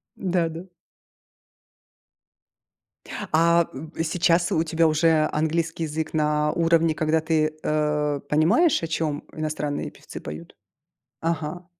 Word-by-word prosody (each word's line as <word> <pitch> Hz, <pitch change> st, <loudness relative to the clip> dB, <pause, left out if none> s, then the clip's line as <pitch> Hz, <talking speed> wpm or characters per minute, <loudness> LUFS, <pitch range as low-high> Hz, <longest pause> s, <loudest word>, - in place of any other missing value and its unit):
Да 175 Hz, -3 st, 0 dB
да. 165 Hz, +4 st, -8 dB, 2.6 s
А, 170 Hz, +1 st, +4 dB
б 160 Hz, +4 st, -5 dB
сейчас 175 Hz, +1 st, +2 dB
у 160 Hz, -, +2 dB
тебя 165 Hz, 0 st, +2 dB
уже 155 Hz, 0 st, +3 dB
английский 160 Hz, +1 st, -1 dB
язык 155 Hz, 0 st, -3 dB
на 150 Hz, -1 st, +1 dB
уровне, 165 Hz, -1 st, +2 dB
когда 155 Hz, 0 st, +1 dB
ты, 155 Hz, -1 st, 0 dB
э, 150 Hz, -1 st, 0 dB
понимаешь, 170 Hz, -, +3 dB
о 165 Hz, -, -1 dB
чем 155 Hz, -2 st, -2 dB
иностранные 150 Hz, -2 st, -3 dB
певцы -, -, -10 dB
поют? 75 Hz, +3 st, -9 dB, 0.7 s
Ага. 165 Hz, +1 st, -3 dB
160 Hz, 110 wpm, -24 LUFS, 150-165 Hz, 2.6 s, А